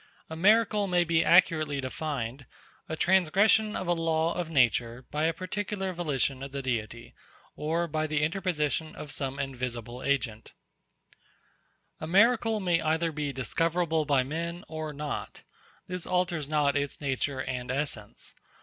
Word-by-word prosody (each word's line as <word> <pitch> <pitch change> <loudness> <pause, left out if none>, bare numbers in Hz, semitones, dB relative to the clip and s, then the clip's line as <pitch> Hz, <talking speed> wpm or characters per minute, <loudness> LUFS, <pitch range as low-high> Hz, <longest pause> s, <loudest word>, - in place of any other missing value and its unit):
A - - -4
miracle 210 +3 +4
may 180 -1 +3
be 165 -1 +2
accurately 155 -4 +4
defined, 135 -2 -4 0.4
_a 160 - -3
transgression 195 +5 +4
of 185 - -3
a 175 - +2
law 165 0 +1
of 175 -2 -3
nature 125 -3 +2
by 150 +1 0
a 165 - +3
particular 190 +1 -3
volition 140 -6 -1
of 135 0 -6
the 140 0 -4
Deity, 115 -2 -3 0.4
or 165 +3 -1
by 155 0 -1
the 150 -1 0
interposition 160 -3 -1
of 150 - -8
some 135 -1 -3
invisible 125 -3 -4
agent_. 130 -5 -2 1.5
A 155 - -5
miracle 225 +4 +4
may 175 -4 +1
either 160 +1 +1
be 150 -2 -2
discoverable 160 +5 0
by 140 -3 +3
men 170 +5 -4
or 155 -1 -5
not. 150 +1 -5 0.4
This 180 -1 -4
alters 175 -5 0
not 150 -2 +2
its 140 -1 -1
nature 135 -1 -1
and 125 -1 -4
essence. 130 -6 -3
155 Hz, 145 wpm, -28 LUFS, 135-175 Hz, 1.5 s, miracle